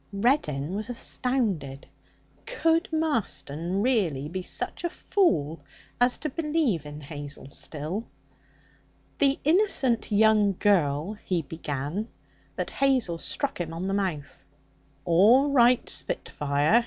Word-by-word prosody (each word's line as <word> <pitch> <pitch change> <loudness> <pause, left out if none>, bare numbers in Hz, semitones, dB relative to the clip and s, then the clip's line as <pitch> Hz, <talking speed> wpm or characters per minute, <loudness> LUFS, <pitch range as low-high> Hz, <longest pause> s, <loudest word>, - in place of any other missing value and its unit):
Reddin 190 - +1
was 215 +3 -4
astounded. 215 - -2 0.6
Could 330 -9 +1
Marston 200 - -1
really 180 - +1
be 185 +3 -4
such 180 - -2
a 345 - 0
fool 165 - 0 0.4
as 245 0 +4
to 305 - -3
believe 295 - -1
in 150 +1 -8
Hazel 145 -1 -6
still? 160 +10 -4 1.1
'The 280 -1 +3
innocent 300 - +2
young 210 -1 +4
girl 170 -3 +2
' - - -30
he 175 -3 -1
began, 150 +6 -4 0.5
but - - -3
Hazel 255 -11 +1
struck 275 - -2
him 165 -1 -5
on 175 +3 -4
the 195 - -1
mouth. 185 -8 -3 0.6
'All 220 +12 +5
right, 250 -2 +4
spitfire!' 145 +9 +1
200 Hz, 115 wpm, -26 LUFS, 155-260 Hz, 1.1 s, All